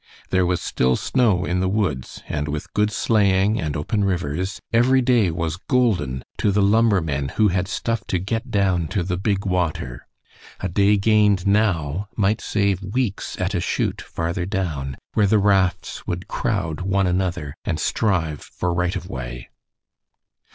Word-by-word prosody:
There 95 -1 +3
was 90 -1 +1
still 65 0 +1
snow 105 - +1
in 90 +1 0
the 95 0 +1
woods, 95 -11 -2
and 75 0 -2
with 75 0 -5
good 105 0 +2
sleighing 105 -1 +2
and 75 -3 -2
open 100 +8 -1
rivers 90 0 -1
every 125 +3 +4
day 120 -6 +3
was 80 0 -2
golden 90 - 0 0.2
to 105 - +2
the 100 0 +2
lumbermen 95 -10 +2
who 110 -2 +4
had 90 +1 0
stuff 110 +2 -2
to 95 - 0
get 105 +5 -3
down 95 -5 +1
to 95 +3 -1
the 90 0 -2
big 100 +1 -1
water. 85 -9 -2 0.5
A 95 - -2
day 100 +3 +3
gained 105 -2 +3
now 100 -3 +1
might 105 +1 +2
save 100 -2 0
weeks 100 +1 -2
at 90 +2 -1
a 90 - +1
chute - - -1
farther 85 +2 -3
down, 75 -9 -3 0.2
where 105 -2 +3
the 110 - +4
rafts 95 -3 +1
would 90 +1 -3
crowd 90 -8 -2
one 95 +1 +1
another 90 -5 -1
and 80 - -2
strive 85 -7 0
for 90 -1 -3
right 90 +2 0
of 95 - -5
way. - - -6
95 Hz, 165 wpm, -22 LUFS, 85-105 Hz, 0.5 s, every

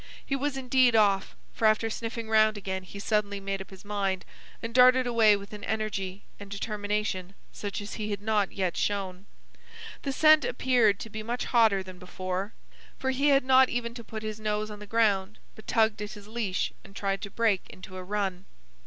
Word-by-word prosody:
He 275 - -1
was 275 0 -2
indeed 255 -2 +3
off, 200 -2 +3 0.2
for 225 - +2
after 215 +1 +3
sniffing 225 0 -4
round 215 -1 +4
again 190 -1 -4
he 185 +2 -11
suddenly 205 -1 0
made 195 0 -3
up 190 - -9
his 190 0 -13
mind, 195 -2 -1 0.3
and 230 0 -6
darted 255 +1 +6
away 225 -3 +5
with 200 +1 -8
an 210 -1 -8
energy 205 -3 -3 0.2
and 205 -1 -9
determination 205 -2 -3 0.2
such 205 -1 -5
as 205 - -7
he 215 -1 -4
had 205 -2 -2
not 210 -1 +1
yet 185 -3 -1
shown. 195 -2 -2 0.7
The 275 - -2
scent 310 +2 +6
appeared 240 -5 +2
to 225 - -7
be 215 - -5
much 235 +3 -3
hotter 220 -5 +3
than 185 -1 -11
before, 185 +2 -4 0.4
for 265 - -1
he 275 +3 +1
had 275 -2 +5
not 260 0 +6
even 235 -1 -2
to 235 -1 -9
put 220 0 -7
his 215 0 -5
nose 215 0 -2
on 210 - -9
the 210 - -10
ground, 210 -2 +1 0.2
but 220 - -15
tugged 220 -2 +2
at 210 0 -5
his 205 -1 -12
leash 215 -4 -2
and 195 - -15
tried 195 -1 -1
to 200 - -5
break 215 -2 0
into 185 0 -11
a 185 - -6
run. 195 -1 -2
210 Hz, 200 wpm, -28 LUFS, 195-230 Hz, 0.7 s, darted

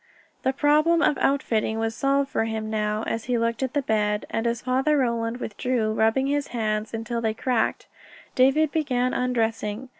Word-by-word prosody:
The 260 - +1
problem 305 +4 +3
of 290 - +2
outfitting 225 -5 +1
was 225 0 -1
solved 275 +3 0
for 225 - 0
him 220 -1 -4
now, 210 0 -1
as 225 - -3
he 245 -1 0
looked 230 +1 -1
at 260 -1 -2
the 285 - +1
bed, 210 -2 0
and 225 +1 -1
as 235 0 -2
Father 265 +4 +2
Roland 235 -3 0
withdrew, 225 -1 -1
rubbing 225 +5 +2
his 285 +1 0
hands 215 -2 -2
until 230 +1 -3
they 220 -1 -1
cracked, 245 0 0 0.5
David 275 +4 +3
began 255 -5 0
undressing. 230 -1 -1
235 Hz, 175 wpm, -25 LUFS, 220-265 Hz, 0.5 s, problem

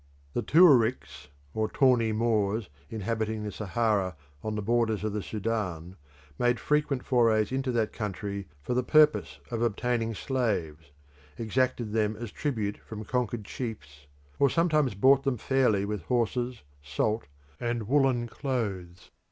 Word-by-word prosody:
The - - 0
Tuaricks 130 - +4 0.3
or 110 0 -1
Tawny 125 -4 +3
Moors 110 -3 0 0.2
inhabiting 110 0 -2
the 105 - -4
Sahara 105 -2 0 0.3
on 110 0 -2
the 105 - -3
borders 110 -1 +1
of 110 -1 -2
the 105 - -2
Sudan, 95 -6 -3 0.4
made 120 0 +2
frequent 150 -3 0
forays 115 -4 +3
into 130 0 -1
that 115 -2 0
country 100 -1 -4 0.2
for - - -2
the 125 - +2
purpose 150 +4 +3
of 115 -1 -2
obtaining 115 0 0
slaves, 90 - -2 0.5
exacted 120 0 0
them 110 -1 +1
as 115 0 -7
tribute 110 -8 -2
from 110 -1 -8
conquered 120 -3 -2
chiefs, 75 - -7 0.3
or 140 - +5
sometimes 155 - +2
bought 135 +7 +5
them 135 -2 -1
fairly 120 -6 +2
with 105 -2 -3
horses, 120 - -1 0.2
salt, 105 +10 -1 0.3
and 120 -3 -2
woollen 130 -3 +2
clothes. 100 -10 -4
115 Hz, 135 wpm, -28 LUFS, 105-125 Hz, 0.5 s, or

